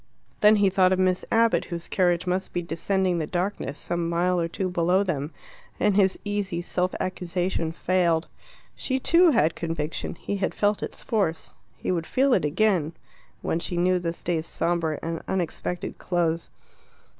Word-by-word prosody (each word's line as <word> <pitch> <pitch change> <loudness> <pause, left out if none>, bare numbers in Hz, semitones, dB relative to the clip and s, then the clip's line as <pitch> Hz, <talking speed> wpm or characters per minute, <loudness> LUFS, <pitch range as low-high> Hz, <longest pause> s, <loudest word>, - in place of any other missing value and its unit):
Then 210 +1 +6
he 200 -2 +3
thought 185 -1 +4
of 185 - +3
Miss 185 -1 +2
Abbott, 230 0 +3
whose 170 -1 -6
carriage 175 -2 +1
must 185 +1 -2
be 175 - -1
descending 180 +1 0
the 155 - -2
darkness 175 -5 -2
some 170 -1 -2
mile 175 +1 +1
or 165 - 0
two 185 +3 -3
below 180 +2 +2
them, 150 -5 -2 0.5
and 205 -2 +2
his 195 -2 +3
easy 205 -4 -2
self 180 +1 -1
accusation 180 -2 -2
failed. 170 -1 +1 0.5
She, 260 -1 -1
too, 340 +6 +5
had 165 - +3
conviction; 165 -2 -3
he 200 +3 -4
had 190 - -2
felt 205 0 +1
its - - -6
force; 195 -8 -1 0.2
he - - -2
would 170 -3 -1
feel 265 0 +3
it - - +2
again 170 -1 +1 0.5
when 165 - 0
she 175 +1 -3
knew 180 +1 +3
this 170 -1 -4
day's 165 -2 -1
sombre 165 -3 -1
and 165 0 -3
unexpected 180 -1 -3
close. 170 -2 -1
180 Hz, 170 wpm, -25 LUFS, 165-190 Hz, 0.5 s, Then